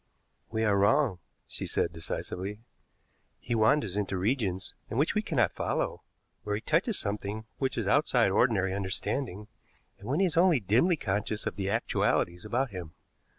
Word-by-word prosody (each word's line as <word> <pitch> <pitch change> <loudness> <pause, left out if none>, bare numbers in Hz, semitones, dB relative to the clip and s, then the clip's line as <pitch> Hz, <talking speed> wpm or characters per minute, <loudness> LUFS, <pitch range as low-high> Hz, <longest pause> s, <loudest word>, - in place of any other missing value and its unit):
"We 110 0 -1
are 105 -2 +3
wrong," 105 -1 +3 0.3
she - - -6
said - - 0
decisively. 95 +5 -5 0.8
"He 120 - -3
wanders 110 -2 +3
into 100 -2 -1
regions 100 -2 -1 0.2
into 115 - -3
which 145 +4 +2
we 215 - +1
cannot 160 - +1
follow - - -2 0.4
where 105 0 -2
he 105 - -3
touches 180 - +1
something 105 +1 -3
which 135 -1 -1
is - - -1
outside 125 -8 +3
ordinary 95 -4 +2
understanding, 100 +2 -2 0.5
and 100 +4 -9
when 145 - +1
he 195 - +4
is 170 -2 0
only 170 -4 +5
dimly 120 - +3
conscious 105 -1 -2
of - - -2
the 95 -1 -2
actualities 90 -5 0
about 120 +3 -1
him. 90 -4 -7
110 Hz, 160 wpm, -29 LUFS, 100-135 Hz, 0.8 s, only